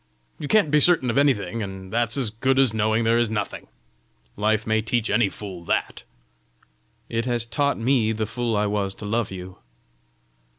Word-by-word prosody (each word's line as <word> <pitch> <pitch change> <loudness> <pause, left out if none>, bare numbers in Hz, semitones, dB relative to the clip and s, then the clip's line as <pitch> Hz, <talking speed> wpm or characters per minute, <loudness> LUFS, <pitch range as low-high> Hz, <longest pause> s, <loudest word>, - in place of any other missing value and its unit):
You 150 - -4
can't 205 -7 +3
be 150 - +5
certain 145 -6 +4
of 115 - -2
anything, 115 -6 +1
and 95 -1 -7
that's 120 +2 0
as 125 -6 -1
good 130 +5 0
as 135 -5 +3
knowing 110 +1 +1
there 115 +1 +3
is 120 -2 +1
nothing! 105 -2 -4 0.7
Life 110 +1 +1
may 110 0 +1
teach 115 +1 -1
any 110 -2 +3
fool 95 -5 -8
that!" - - -2 1.0
"It 115 +1 -2
has 120 -2 -1
taught 140 +5 0
me 115 -1 +2
the 110 0 -2
fool 115 0 -2
I 105 - +1
was 100 -2 -1
to 105 - -9
love 115 +1 -1
you!" 95 0 -9
110 Hz, 180 wpm, -24 LUFS, 105-120 Hz, 1.0 s, be